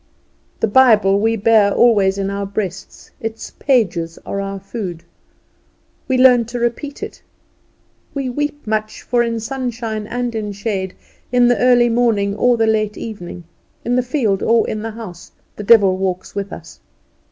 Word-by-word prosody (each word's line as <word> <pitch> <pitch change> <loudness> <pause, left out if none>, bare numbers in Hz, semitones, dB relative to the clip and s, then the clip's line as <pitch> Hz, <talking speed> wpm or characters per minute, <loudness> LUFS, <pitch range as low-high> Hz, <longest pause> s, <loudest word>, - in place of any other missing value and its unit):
The - - +2
Bible 210 -4 +5
we 225 +2 +1
bear 215 -1 +4
always 200 -4 +3
in 195 0 -2
our 200 0 -3
breast; 195 -2 -6
its 225 0 -6
pages 180 - +1
are 200 - -3
our 195 0 -5
food; 190 -4 -6 1.0
we 260 - +1
learn 250 -2 +6
to 235 +2 -6
repeat 240 +5 -3
it; - - -8 0.9
we 275 -2 -2
weep 290 +3 -3
much, 215 0 -3
for 240 -1 +1
in 230 -1 -1
sunshine 230 -3 -4
and 245 0 -3
in 210 -2 -3
shade, 195 -2 -3 0.4
in 245 -1 +4
the 245 - +2
early 245 -1 +5
morning 225 -4 +1
or 245 +2 +3
the 225 - +2
late 215 -1 0
evening, 180 -5 -7 0.4
in 245 - +1
the 250 - +3
field 240 -7 0
or 230 0 +3
in 215 - -3
the 225 - -4
house, 215 -6 -10 0.2
the 210 - -7
devil 200 -3 +5
walks 185 -1 -3
with 200 0 -4
us. - - -10
220 Hz, 165 wpm, -18 LUFS, 200-240 Hz, 1.0 s, learn